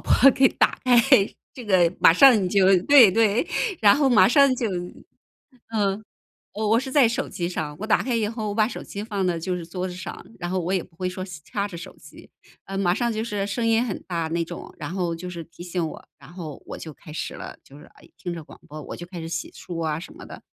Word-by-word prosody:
播 275 - +5
给 265 0 +4
打 - - +1
开， 255 - +4 0.6
这 250 - -10
个 180 -4 +3
马 165 - +7
上 245 +2 +7
你 180 - 0
就 190 0 +4
对， 270 -8 +8
对， 220 - +2 0.3
然 205 -2 +6
后 285 -2 +3
马 210 -7 +6
上 275 0 +5
就 240 - -1 1.1
嗯， 205 0 0 0.5
我 215 +1 -2
我 225 - +5
是 265 0 -5
在 275 -6 +5
手 235 - -2
机 175 -1 -3
上， 150 -4 -4
我 215 - -4
打 215 - +2
开 255 - -2
以 220 -2 0
后 220 -2 -4
我 205 - -4
把 215 0 +2
手 - - -7
机 200 - -7
放 205 -4 -2
到 175 - 0
就 180 +2 -3
是 170 - -7
桌 180 +2 -4
子 180 - -7
上， 180 -1 -8
然 175 -1 -4
后 185 0 0
我 175 +2 -2
也 185 -3 +1
不 165 - -24
会 185 0 -2
说 185 0 -5 0.2
掐 200 -1 -3
着 185 -4 -8
手 170 - -10
机， - - -16 0.4
呃， 195 0 -5
马 180 -3 +2
上 235 +2 -1
就 220 +1 -3
是 205 -3 -3
声 230 +3 -2
音 230 +1 +3
很 210 - -4
大 170 -3 -2
那 170 +1 -1
种， - - -9
然 - - -6
后 175 -3 -1
就 180 +2 -7
是 170 -2 -6
提 170 +2 -13
醒 175 -1 -2
我， - - -11
然 140 +5 -15
后 160 -5 -8
我 - - -7
就 160 - -8
开 155 - -13
始 - - -5
了， - - -9
就 140 - -15
是， 150 - -14 0.2
诶， - - -20
听 175 -2 -5
着 165 -2 -7
广 - - -15
播 155 +1 -8
我 - - -8
就 175 - -8
开 175 -2 -8
始 165 - -6
洗 165 -1 -4
漱 165 -2 -6
啊 155 0 -1
什 185 - -10
么 335 - -11
的， - - -11
190 Hz, 275 characters per minute, -24 LUFS, 170-225 Hz, 1.1 s, 对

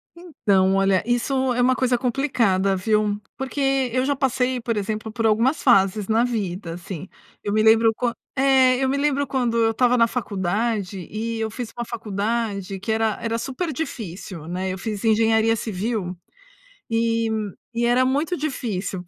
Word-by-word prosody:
Então, 200 - +1
olha, 195 -1 +3
isso 250 +2 +1
é 245 - 0
uma 255 +1 +4
coisa 255 -1 +1
complicada, 230 -7 +1
viu. 210 +1 +1 0.2
Porque 270 -1 0
eu 255 - +2
já 285 - +2
passei, 260 -1 0
por 230 -1 -2
exemplo, 215 +1 -3
por 225 0 -2
algumas 230 +7 +2
fases 195 -5 +4
na 225 +2 +3
vida, 190 -7 -3
assim. 175 +1 -7 0.4
Eu 205 - -2
me 215 0 +3
lembro 225 0 +5
quan 240 0 -1 0.2
é, 265 -2 +4
eu - - +2
me 275 - 0
lembro 285 0 +1
quando 245 -3 0
eu 225 -1 +3
estava 250 +2 +3
na 230 -1 +5
faculdade 205 -2 -2
e 225 +1 -3
eu 220 0 -1
fiz 240 0 -5
uma 240 - -3
faculdade 210 -3 -3
que 200 +4 -3
era 220 -1 +1
era 230 0 -1
super 270 +8 -3
difícil, 190 - -6
né. 185 +2 -3
Eu - - -5
fiz 205 +1 -5
engenharia 225 0 +3
civil 210 -3 -3 0.7
e 230 0 +1 0.5
e 235 +1 0
era 245 +2 +4
muito 290 +7 0
difícil. 215 - -3
225 Hz, 165 wpm, -23 LUFS, 205-255 Hz, 0.7 s, lembro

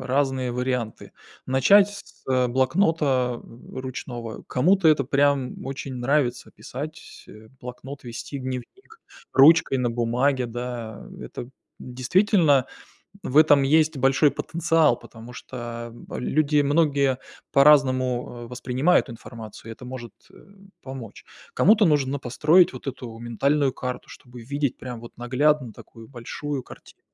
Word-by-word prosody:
разные 130 -1 0
варианты. 125 -3 -3 0.3
Начать 195 +11 +5
с - - -22 0.2
блокнота, 130 -2 +1
м, 115 - -14
ручного. 120 -3 -6
Кому-то 175 +6 +3
это 150 -3 +3
прям 140 -1 0
очень 135 0 -6
нравится- 125 0 0
писать, 150 +5 -9
э, 110 +1 -14
блокнот, 130 +3 -9
вести 120 +4 -7
дневник 130 - -8 0.3
ручкой 145 -2 +6
на 120 -1 0
бумаге, 125 +3 0
да. 120 -2 -6
Это 120 - -8 0.3
действительно, 145 - +2 0.6
в 135 - -4
этом 150 -2 +6
есть 155 +2 +3
большой 135 +2 +3
потенциал, 160 -2 +1
потому 115 +1 -13
что 120 -2 -8 0.2
люди 150 +2 +1
многие 140 -3 +2 0.3
по-разному, 130 -4 +3
э, - - -9
воспринимают 125 +7 +1
информацию, 115 -1 -10
и - - -5
это 125 - -13
может, 125 -3 -8 0.2
э, - - -19 0.5
помочь. 130 -5 -9 0.3
Кому-то 210 +3 +5
нужно 140 -3 +1
построить 150 +8 +3
вот 130 +1 -7
эту 125 -3 -7
ментальную 135 +4 +1
карту, 125 0 -6
чтобы 120 -1 -13
видеть 140 +2 -2
прям 125 -2 -7
вот 120 - -13
наглядно 130 +1 +1
такую 115 +1 -14
большую 135 +2 -6
картину. - - -15
130 Hz, 125 wpm, -24 LUFS, 120-145 Hz, 0.6 s, ручкой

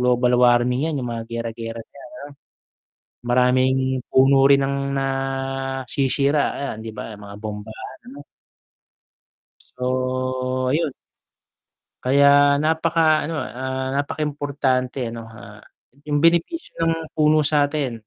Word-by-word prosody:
global 125 0 +2
warming 120 +1 +3
yan 155 -3 -2
yung 125 - -4
mga 115 -1 -4
giyera-giyera 115 0 -5
diyan 140 +6 -14 1.0
ano. - - -83 0.2
Maraming 130 +1 +3 0.3
puno 135 +1 +5
rin 140 0 +5
ang 140 - -2 0.2
nasisira, 135 +1 0
ayan, 140 -6 -4
'di 115 - -7
ba, 110 +1 -7
mga 100 0 -10
bombahan, 105 0 -8
ano? 140 +2 -11 1.6
So, 130 0 -1
ayun. 160 -1 0 1.1
Kaya 140 +2 +4 0.4
napaka 160 +1 +1 0.3
ano, 165 - -4 0.2
ah, 130 0 -3
napakaimportante 140 -3 -2
ano, 115 - -7 0.2
ah, - - -12 0.5
yung 145 0 +1
benepisyo 170 - +1 0.2
ng 165 - +2 0.2
puno 155 0 +3
sa'tin. 145 -2 +1
130 Hz, 110 wpm, -22 LUFS, 125-145 Hz, 1.6 s, puno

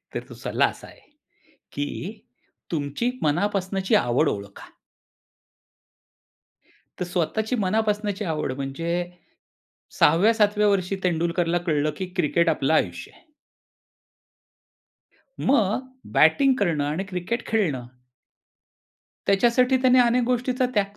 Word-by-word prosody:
तर - - -3
तो - - -9
सल्ला - - 0
असा - - -5
आहे, - - -16 0.7
की 180 +9 -5 0.5
तुमची 155 - -1
मनापासूनची 190 +4 0
आवड 125 +6 +2
ओळखा. 100 0 -7 2.3
तर - - 0
स्वतःची 195 +7 -1
मनापासूनची 210 0 0
आवड 155 -5 -2
म्हणजे, 165 +6 -3 0.9
6व्या-7व्या 210 +5 +4
वर्षी 195 -1 +1
तेंडुलकरला 170 0 0
कळलं, 150 -1 +1
की 190 - -3
क्रिकेट 170 0 +2
आपलं 150 -1 +1
आयुष्य 85 - -1
आहे. - - -24 2.1
मग 255 0 +1 0.2
बॅटिंग 260 - +4
करणं 165 -7 +1
आणि 155 +6 -2
क्रिकेट 190 +5 -4
खेळणं 155 - -1 1.4
त्याच्यासाठी 240 +6 +3
त्याने 255 -1 +5
अनेक 245 +1 +3
गोष्टींचा 250 +1 0
त्याग 200 0 0
185 Hz, 100 wpm, -24 LUFS, 160-220 Hz, 2.3 s, त्याने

